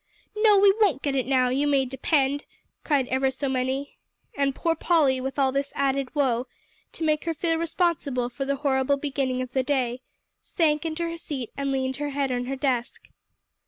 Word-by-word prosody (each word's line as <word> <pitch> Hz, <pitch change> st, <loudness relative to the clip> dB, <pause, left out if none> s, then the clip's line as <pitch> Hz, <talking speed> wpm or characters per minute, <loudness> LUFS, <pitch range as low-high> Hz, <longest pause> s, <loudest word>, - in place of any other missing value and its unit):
"No, 425 Hz, -1 st, +5 dB
we 395 Hz, 0 st, +6 dB
won't 330 Hz, -, +3 dB
get 280 Hz, -, 0 dB
it 260 Hz, -3 st, 0 dB
now, 255 Hz, -2 st, +3 dB
you 275 Hz, +3 st, +1 dB
may 275 Hz, -2 st, +3 dB
depend," 270 Hz, +2 st, 0 dB, 0.4 s
cried 280 Hz, -5 st, +1 dB
ever 265 Hz, +1 st, +2 dB
so 265 Hz, +2 st, -3 dB
many. 265 Hz, +2 st, -2 dB, 0.4 s
And 275 Hz, -1 st, 0 dB
poor 330 Hz, -, +1 dB
Polly, 300 Hz, -6 st, +2 dB
with 265 Hz, +1 st, -4 dB
all 270 Hz, -2 st, +3 dB
this 275 Hz, +1 st, -1 dB
added 275 Hz, 0 st, -1 dB
woe, 260 Hz, -3 st, +1 dB, 0.5 s
to -, -, -5 dB
make 305 Hz, 0 st, +1 dB
her 330 Hz, -1 st, -1 dB
feel 330 Hz, +1 st, 0 dB
responsible 325 Hz, -7 st, 0 dB
for 250 Hz, +3 st, -5 dB
the 280 Hz, +1 st, 0 dB
horrible 275 Hz, 0 st, +1 dB
beginning 270 Hz, -3 st, -1 dB
of 255 Hz, -, -8 dB
the 260 Hz, -, +1 dB
day, 255 Hz, -2 st, -1 dB, 0.4 s
sank 310 Hz, -1 st, 0 dB
into 320 Hz, +1 st, -3 dB
her 335 Hz, 0 st, -3 dB
seat 270 Hz, -7 st, -6 dB
and 275 Hz, -1 st, -2 dB
leaned 265 Hz, -1 st, -1 dB
her 290 Hz, 0 st, -2 dB
head 275 Hz, -1 st, -1 dB
on 245 Hz, 0 st, -1 dB
her 270 Hz, +2 st, -3 dB
desk. 260 Hz, -3 st, -2 dB
275 Hz, 195 wpm, -25 LUFS, 260-300 Hz, 0.5 s, we